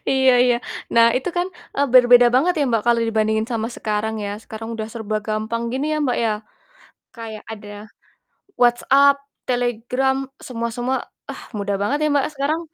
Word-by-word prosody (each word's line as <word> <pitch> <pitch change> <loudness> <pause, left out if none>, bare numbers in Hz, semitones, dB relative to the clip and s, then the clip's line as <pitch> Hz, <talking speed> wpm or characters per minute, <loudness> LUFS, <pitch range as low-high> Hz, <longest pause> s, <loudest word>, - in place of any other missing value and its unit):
Iya 265 -1 +4
iya. 245 -1 +3 0.4
Nah 230 0 +7
itu 260 - -2
kan, 350 +1 +1 0.3
eee, 285 - +2
berbeda 245 -1 +8
banget 305 +8 +4
ya, 290 - +2
Mbak, 225 -3 +1
kalau 235 -1 +3
dibandingin 220 0 +1
sama 225 -1 -1
sekarang 215 0 -2
ya, 200 - -3
sekarang 225 0 -8
udah 220 -1 -5
serba 220 -2 -3
gampang 220 +2 -2
gini 270 +3 -1
ya, 305 - 0
Mbak, 250 - 0
ya 220 - +2 0.8
kayak 225 -2 -8
ada 210 -1 -9 0.9
WhatsApp, 270 +4 +5 0.3
Telegram, 245 +2 0 0.3
semua-semua, 240 +1 -2 0.3
ah - - -8 0.2
mudah 200 0 -1
banget 270 +8 0
ya, 305 - +3
Mbak, 280 -2 +2
sekarang? 290 +4 -1
240 Hz, 160 wpm, -21 LUFS, 220-265 Hz, 0.9 s, berbeda